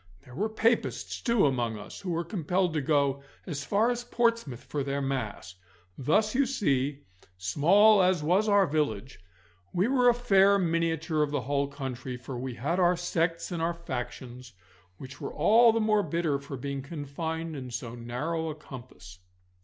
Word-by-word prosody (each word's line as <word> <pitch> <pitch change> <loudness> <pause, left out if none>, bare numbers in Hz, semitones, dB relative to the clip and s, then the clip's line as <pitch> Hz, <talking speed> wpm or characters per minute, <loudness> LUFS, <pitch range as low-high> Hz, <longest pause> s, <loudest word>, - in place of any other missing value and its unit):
There 125 - -14
were 210 - -1
Papists, 225 +2 0
too, 235 - +3
amongst 120 -5 0
us, - - -10
who 190 - -5
were 170 0 -1
compelled 175 0 -1
to 155 - 0
go 140 -1 +1 0.2
as 145 -5 -4
far 215 +8 +2
as 240 0 -3
Portsmouth 230 - 0
for 145 -2 -3
their 140 +1 -2
Mass. 130 -9 -3 0.4
Thus, 210 - +1
you 270 +1 +2
see, 145 - 0 0.3
small 185 - +5
as 180 -4 +2
was 190 +7 +2
our 200 -1 +5
village, 135 - -2 0.5
we 180 +4 +1
were 250 -1 +4
a 240 - +3
fair 200 -4 +4
miniature 165 -3 0
of 150 - +1
the 145 -2 -1
whole 140 +2 0
country, 130 -3 -6
for 125 +1 -8
we 125 0 -5
had 155 +10 -1
our 175 -1 +3
sects 170 -1 -1
and 170 -2 -3
our 170 +1 0
factions, 125 -5 -7 0.4
which 130 +3 -11
were - - -5
all 230 +2 +6
the 225 - 0
more 215 -1 +3
bitter 165 -6 -1
for 140 -1 -7
being 140 +2 -4
confined 160 +3 -5
in 130 -3 -6
so 120 -1 -5
narrow 140 +8 -3
a 155 - -5
compass. 120 -11 -12
155 Hz, 175 wpm, -28 LUFS, 135-190 Hz, 0.5 s, all